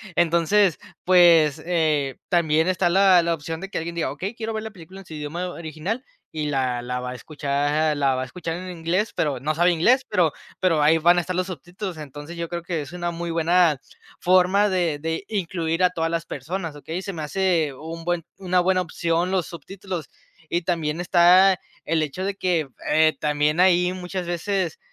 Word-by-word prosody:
Entonces, 170 +2 +3 0.2
pues, 165 -5 +5
eh, 155 -6 0
también 160 -1 +2
está 180 -1 +1
la 190 0 +5
la 170 0 0
opción 160 +1 -5
de 195 +2 -7
que - - -4
alguien 170 +1 -4
diga: 165 -5 -1
"Okey, 185 - -5
quiero 225 -1 -5
ver 220 0 -3
la 220 - -6
película 190 0 -12
en - - -16
su 160 - -9
idioma 155 +5 -4
original", 170 - -5 0.3
y 155 -1 -3
la 130 -3 0
la 125 +1 -3
va 125 - -4
a - - -6
escuchar 145 +2 -1
la 140 -2 +2
va 130 - -2
a - - -2
escuchar 165 +4 -5
en 185 +1 -7
inglés, 180 +5 -1
pero 145 -4 -1
no 155 +3 -1
sabe 175 +2 +4
inglés, 240 +11 +3
pero 180 -6 +2 0.3
pero 165 -5 +3
ahí 160 +2 +5
van 175 +2 +5
a - - +3
estar 180 +1 -4
los 185 0 -1
subtítulos. 180 +2 -7
Entonces, 145 +3 -9
yo 170 0 -3
creo 170 0 -5
que 170 -2 -2
es 145 - -9
una 175 -1 -3
muy 170 0 -5
buena 165 -1 +3 0.4
forma 185 +3 +4
de 175 -6 0
de 160 +5 -3
incluir 175 -4 -1
a 180 - +6
todas 165 -2 -2
las 165 0 -2
personas, 165 +3 -5
okey, 160 +5 -5
se 195 - -5
me 160 -5 -6
hace 165 -2 0
un 165 +4 -8
buen 175 -1 -1
una 185 -1 +1
buena 185 +1 +2
opción 170 +1 -1
los 185 -4 0
subtítulos 175 -1 -7 0.4
y 170 +2 -1
también 165 -2 -1
está 180 +2 +5 0.3
el 160 0 +1
hecho 155 +5 -4
de 195 0 -2
que, 175 -6 0 0.2
eh, 155 0 +4
también 150 +2 +1
ahí 180 -1 +4
muchas 180 0 -5
veces, 175 0 -2
170 Hz, 200 wpm, -23 LUFS, 155-185 Hz, 0.4 s, a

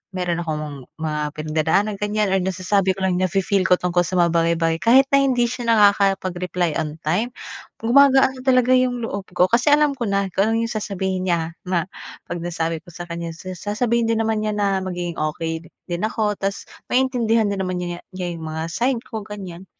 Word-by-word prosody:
meron 175 -2 -1
akong 150 -5 -5
mga 155 -1 -2
pinagdadaanan 160 +7 0
ganyan 210 -1 0
or 195 - +3
nasasabi 190 +1 0
ko 190 - -5
lang 180 -1 +1
na-fe-feel 190 +1 +1
ko 180 - +6
tungkol 180 0 +1
sa 185 - -3
mga 170 -1 +4
bagay-bagay. 165 -1 +1
Kahit 260 +4 +6
na 275 - +6
hindi 255 -3 +2
siya 240 0 -4
nakakapag-reply 185 -5 +2
on 155 -1 -3
time. 180 +10 0 0.5
Gumagaan 265 +2 +4
na - - -8
talaga 255 -1 +3
yung 250 -2 +2
loob 200 -3 -5
ko 180 - +5
kasi 235 +4 +2
alam 295 0 +4
ko 245 -4 -3
na 200 0 +1
kung 200 +3 +2
ano 230 - +1
yung 230 - -3
sasabihin 190 -3 -2
niya 165 -2 0
na 175 -2 0 0.4
'pag 170 +1 -5
nasabi 165 -1 -2
ko - - -16
sakanya, 170 0 -6
sa 185 +2 -8
sasabihin 225 +5 0
din 230 - +2
naman 220 -1 0
niya 215 -1 -1
na 200 -2 +1
magiging 175 -2 -4
okey 160 +2 -3 0.2
din 175 0 -2
ako 215 -1 0
tapos 195 0 -3 0.2
maintindihan 240 -4 +2
din 200 - -3
naman 185 -1 -2
niya 175 -1 -4 0.2
niya 180 -1 -3
yung 160 -1 -7
mga 160 0 -4
side 240 +4 0
ko 220 -2 -6
ganyan. 190 -3 -8
190 Hz, 190 wpm, -21 LUFS, 170-225 Hz, 0.5 s, ko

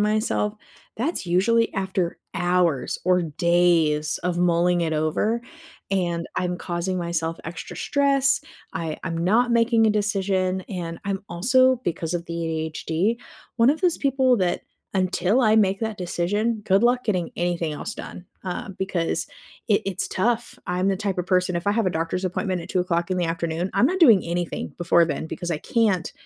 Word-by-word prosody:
myself, 210 0 +1 0.4
that's 250 - -2
usually 230 +7 +2
after 190 -3 -1 0.2
hours 175 -5 +1
or 180 0 +3
days 165 -2 +2
of 180 -1 -1
mulling 175 0 +2
it 160 -1 -1
over, 155 +10 0 0.5
and 175 -3 0
I'm 180 -1 -1
causing 180 +1 -3
myself 165 -1 -2
extra 165 0 -7
stress, 275 -1 +2 0.3
I 160 -1 -3
I'm 165 -2 -3
not 225 +8 +2
making 230 -1 +4
a - - +4
decision, 195 -3 0
and 170 -3 -5
I'm 195 -1 -2
also- 255 +8 +3
because 170 0 -2
of 170 -1 -2
the 170 - -6
ADHD- 160 +6 -1 0.4
one 235 +3 +5
of 315 - -1
those 360 -3 +2
people 265 -2 +3
that, 180 -3 0 0.3
until 190 +4 +2
I 215 -1 +4
make 195 -1 +3
that 220 -2 -3
decision, 205 +5 -1
good 195 +2 +3
luck 245 +1 +3
getting 185 -6 -1
anything 175 -2 -1
else 175 +8 -5
done, 175 - -9 0.2
um, 185 +1 -5
because 185 -3 -1 0.4
it 205 - +3
it's 195 -2 -2
tough. 235 +4 -1
I'm 180 +2 0
the 195 - +1
type 195 -2 -2
of 180 - -2
person 180 -1 +1
if 170 - -4
I 205 - +3
have 225 0 +1
a - - +2
doctor's 165 +3 -2
appointment 185 0 -1
at - - -10
2:00 180 -1 0
in 185 - +1
the 175 - +1
afternoon, 165 +2 -2
I'm - - +4
not 375 +3 -1
doing 230 - +7
anything 175 0 -3
before 170 0 +4
then 155 -1 -3
because 175 +1 -5
I 155 - -1
can't 210 -5 +1
185 Hz, 175 wpm, -24 LUFS, 170-215 Hz, 0.5 s, doing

